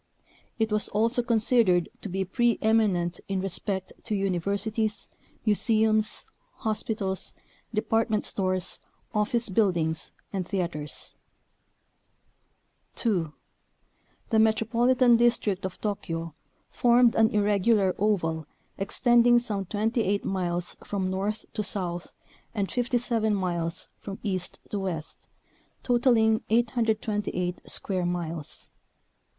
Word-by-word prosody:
It 220 -1 0
was 210 0 +1
also 230 +4 +2
considered 225 -6 +3
to 205 - -5
be 190 +1 -1
pre 235 +4 +2
eminent 200 -6 +2
in 195 -1 -1
respect 190 0 -3
to 215 - -1
universities, 200 +3 -1 0.3
museums, 215 0 +2 0.3
hospitals, 215 -4 -2 0.4
department 225 0 +1
stores, 185 -2 -1 0.3
office 220 +2 +1
buildings, 175 -6 +1 0.2
and 185 -3 -2
theaters. 170 -6 -4 1.8
2. 180 -10 0 1.0
The 220 - +4
Metropolitan 235 +3 +4
District 230 -5 +2
of 190 - -5
Tokyo 165 -6 -3 0.4
formed 240 -1 +5
an 220 0 +4
irregular 205 -1 +3
oval 165 -7 0 0.3
extending 240 +4 +4
some 210 -5 -1
28 210 0 0
miles 175 -2 -2
from 190 -2 -2
north 205 +3 -2
to - - -1
south 180 -4 -3 0.4
and 200 -2 -1
57 235 -3 +1
miles 170 -3 -2
from 195 -1 -7
east 185 -4 -2
to 205 - -1
west, 170 -5 -4 0.6
totaling 235 -3 +3
828 215 -5 0
square 185 -3 -1
miles. 170 -3 -4
205 Hz, 100 wpm, -27 LUFS, 185-225 Hz, 1.8 s, formed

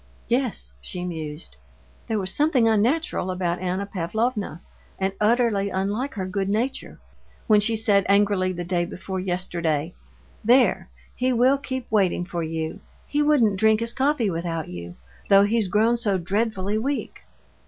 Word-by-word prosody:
"Yes," 245 -1 -1
she 180 -1 -5
mused, 155 - -6 0.5
"there 220 - 0
was 190 -2 0
something 290 -6 +3
unnatural 225 - +1
about 180 -1 -1
Anna 185 +2 -2
Pavlovna, 200 0 -2 0.4
and 190 0 -1
utterly 215 -3 +2
unlike 205 +8 -2
her 190 -3 -3
good 195 +1 -2
nature, 235 +6 -2 0.5
when 215 -1 +5
she 225 +2 +2
said 210 -3 +2
angrily 200 -2 +3
the 175 -1 -4
day 175 0 0
before 185 +2 -5
yesterday: 175 -4 -2 0.5
'There, 245 +3 +3 0.3
he 255 +1 +1
will 255 +3 +3
keep 260 -3 -4
waiting 190 -4 +2
for 175 -1 -4
you; 160 0 -4 0.3
he 295 - 0
wouldn't 260 -10 +3
drink 220 +1 +4
his 230 0 -2
coffee 265 -6 +1
without 165 -1 -3
you, 85 0 -8 0.3
though 195 0 +7
he's 215 0 +1
grown 220 +5 +2
so 205 -5 +1
dreadfully 200 +2 -1
weak. 275 +5 -3
200 Hz, 150 wpm, -24 LUFS, 180-230 Hz, 0.5 s, though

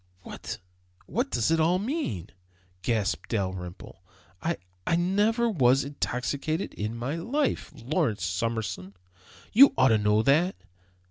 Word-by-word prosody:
"What - - -7 0.5
what 245 +6 -1
does 120 - +1
it 165 - +3
all 165 +3 +3
mean?" 195 - -3 0.5
gasped 110 -1 -1
Dalrymple. 95 -3 -4 0.4
"I 170 +1 -1 0.3
I 165 - +3
never 205 +7 +2
was 135 - +3
intoxicated 140 +3 -2
in 105 +2 -4
my 130 +7 -3
life, 270 - -1
Lawrence 115 -7 -1
Summerson; 95 -1 -3 0.6
you 275 +6 +8
ought 130 0 +5
to 110 -1 +4
know 105 +1 +3
that! 160 +9 +3
130 Hz, 125 wpm, -27 LUFS, 105-180 Hz, 0.6 s, you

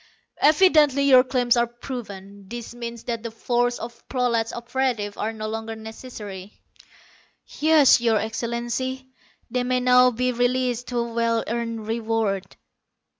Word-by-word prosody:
"Evidently 300 -3 +5
your 260 -2 +7
claims 250 -2 +1
are 235 0 +2
proven. 205 -5 -9
This 240 0 -7
means 235 -1 -7
that 230 -2 -3
the 230 - -5
force 240 +2 0
of 235 +1 -9
prolat 235 -3 0
operatives 235 -4 -2
are 220 - -2
no 215 -1 -6
longer 225 +1 -5
necessary." 220 -3 -9 1.0
"Yes, 300 -5 +5
Your 230 -2 +3
Excellency. 240 +4 -3 0.4
They 250 -1 0
may 250 0 +1
now 250 0 +5
be 250 +1 -1
released 245 0 0
to 245 - -3
a 235 -1 -2
well 230 -1 +1
earned 230 -1 -3
reward." 220 -4 -2
235 Hz, 135 wpm, -23 LUFS, 225-250 Hz, 1.0 s, your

